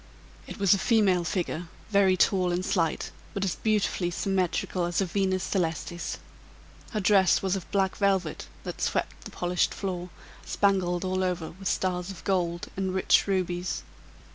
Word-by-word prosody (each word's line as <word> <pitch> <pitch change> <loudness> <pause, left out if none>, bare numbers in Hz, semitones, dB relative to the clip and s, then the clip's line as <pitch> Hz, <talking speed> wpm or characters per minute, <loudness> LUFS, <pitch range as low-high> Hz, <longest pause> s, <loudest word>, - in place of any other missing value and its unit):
It - - -7
was 195 -3 +5
a 200 - +1
female 195 -5 +3
figure, 170 -1 -2 0.2
very 195 -2 +4
tall 185 -1 +3
and 180 +1 -1
slight, 165 -3 0 0.2
but 200 - -1
as 185 - 0
beautifully 210 -4 +1
symmetrical 185 0 0
as 175 -1 -1
a 195 - +2
Venus 190 0 0
Celestis. 175 -2 -2 0.7
Her 215 - -2
dress 195 -1 +4
was 190 0 +1
of 190 - -6
black 195 -2 +1
velvet, 190 -5 0 0.2
that - - -6
swept - - -1
the - - -6
polished 175 0 0
floor, 180 -2 -4 0.3
spangled 185 -3 +1
all 185 0 0
over 180 -3 -2
with 190 +3 -7
stars 180 -1 0
of 190 -4 -8
gold 175 -3 0
and 190 -1 -2
rich 190 - +4
rubies. 180 -2 -1
185 Hz, 160 wpm, -27 LUFS, 175-195 Hz, 0.7 s, was